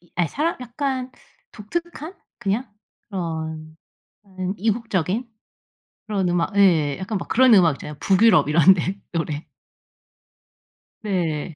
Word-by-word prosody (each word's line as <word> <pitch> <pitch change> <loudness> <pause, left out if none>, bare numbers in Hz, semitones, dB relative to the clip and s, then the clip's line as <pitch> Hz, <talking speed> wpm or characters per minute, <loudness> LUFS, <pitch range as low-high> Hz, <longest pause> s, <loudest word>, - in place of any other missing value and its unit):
이 175 - -27
아이 175 -2 +1
사람 315 - -1
약간 255 +1 -3 0.4
독특한 335 - -6 0.2
그냥 210 +3 -2 0.4
그런 160 -4 -5 0.5
음 190 -1 -5
이국적인 220 0 -1 0.8
그런 200 -4 0
음악 175 +4 -1
예. 160 -8 +4
약간 200 +3 -3
막 175 - -7
그런 255 0 +5
음악 175 -7 +6
있잖아요 150 - -8
북유럽 195 -7 +4
이런 170 +4 +6
데 185 +2 -3
노래. 155 -2 -3 1.6
네. 170 -6 -2
190 Hz, 230 characters per minute, -22 LUFS, 165-225 Hz, 1.6 s, 음악